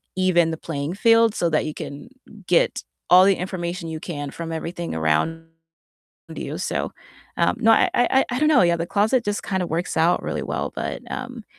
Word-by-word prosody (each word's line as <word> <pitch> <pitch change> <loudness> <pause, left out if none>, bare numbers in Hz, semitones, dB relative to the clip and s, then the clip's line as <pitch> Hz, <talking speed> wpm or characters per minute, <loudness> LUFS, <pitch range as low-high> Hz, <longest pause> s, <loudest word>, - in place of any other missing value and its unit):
even 185 -3 +3
the 160 - -4
playing 150 0 -4
field 230 +1 +4
so 170 - +1
that 155 - +1
you 155 - -4
can 145 +12 -8 0.4
get 175 - +2 0.3
all 180 +1 +8
the 195 0 +4
information 175 -2 -4
you 160 - -5
can 145 -4 -6
from 165 +2 -6
everything 165 +1 -5
around 80 - 0 0.9
you, - - -5
so, - - -2 0.5
um - - +2
No, 225 -2 +4
I - - +4
I 265 +2 +3
I 245 - -1
don't 305 - +4
know, 300 -9 +5
yeah, 170 -1 +3
the 170 0 -3
closet 220 +6 +1
just 205 0 -2
kinda 190 -2 -1
works 170 +2 -3
out 165 +2 +3
really - - -3
well, - - -3
but, - - -4
um, 250 -3 -6
175 Hz, 190 wpm, -22 LUFS, 165-210 Hz, 0.9 s, all